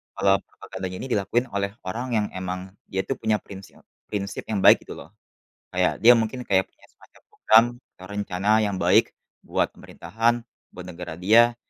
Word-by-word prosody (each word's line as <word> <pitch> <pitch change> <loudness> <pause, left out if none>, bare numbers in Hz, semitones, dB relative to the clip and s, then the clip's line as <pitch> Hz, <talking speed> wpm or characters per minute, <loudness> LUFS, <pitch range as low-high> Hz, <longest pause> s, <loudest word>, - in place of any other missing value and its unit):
kalau 95 0 +3
propaganda 95 - -8
ini 130 - -6
dilakuin 110 +4 +1
oleh 100 0 -1 0.2
orang 120 +7 -4
yang 105 -1 +1
emang, 95 0 -5 0.2
dia 95 - -2
tuh 135 - -4
punya 110 -1 +1
prinsil 95 -1 -13 0.2
prinsip 100 -1 -4
yang 105 -3 -1
baik - - +6
gitu - - -8
loh. - - -11 0.6
Kayak 90 0 +2
dia 120 - +10
mungkin 125 +3 -3
kayak 95 -1 +2
punya - - -24
semacam - - -22
program 110 +1 +5 0.3
atau 95 - -12
rencana 100 -1 -3
yang 100 -2 -1
baik - - +3 0.3
buat - - -1
pemerintahan, 115 +1 -1 0.4
buat 90 - -10
negara 90 -2 -7
dia, 115 +6 +5
100 Hz, 170 wpm, -24 LUFS, 95-110 Hz, 0.6 s, dia